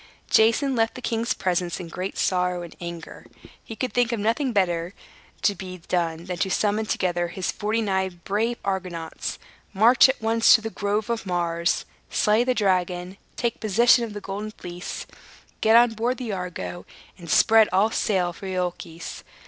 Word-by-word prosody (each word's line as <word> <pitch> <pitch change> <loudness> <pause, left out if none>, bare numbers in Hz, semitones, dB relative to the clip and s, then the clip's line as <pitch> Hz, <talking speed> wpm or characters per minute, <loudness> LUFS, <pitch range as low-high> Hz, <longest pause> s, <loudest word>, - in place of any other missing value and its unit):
Jason 230 +5 +4
left 225 -1 +1
the - - -6
king's 230 -1 -1
presence 180 -1 -1
in 180 - -6
great 185 +4 -5
sorrow 180 -1 0
and 170 - -10
anger. 170 -1 -8 0.4
He 225 - -8
could 255 +2 -3
think 245 -1 +2
of 235 - -1
nothing 230 +6 0
better 180 -3 0 0.5
to 205 - +4
be 185 -1 -8
done 170 -1 -2
than 180 -1 -4
to 190 - 0
summon 210 +3 0
together 175 -3 0
his 180 +1 -3
forty 220 +2 -1
nine 190 -3 -1
brave 225 +6 0
Argonauts, 180 -4 -4 0.4
march 235 +6 +6
at 265 - -1
once 225 +1 +5
to 220 - +1
the 225 0 -5
Grove 205 +3 -1
of 225 -3 -3
Mars, 170 -1 0 0.2
slay 215 +3 +3
the 255 0 0
dragon, 185 -2 0 0.2
take 235 -2 -2
possession 235 +3 +4
of 225 -2 -5
the 205 - -6
Golden 200 +2 -5
Fleece, 180 -3 -7 0.6
get 220 +1 +5
on 240 0 +6
board 235 +3 -1
the 245 -4 -4
Argo, 180 -1 -5 0.4
and 170 -2 -10
spread 220 +7 +5
all 200 +4 +3
sail 180 -6 0
for 195 - -9
Iolchos. 180 -3 -4
195 Hz, 175 wpm, -24 LUFS, 180-225 Hz, 0.6 s, march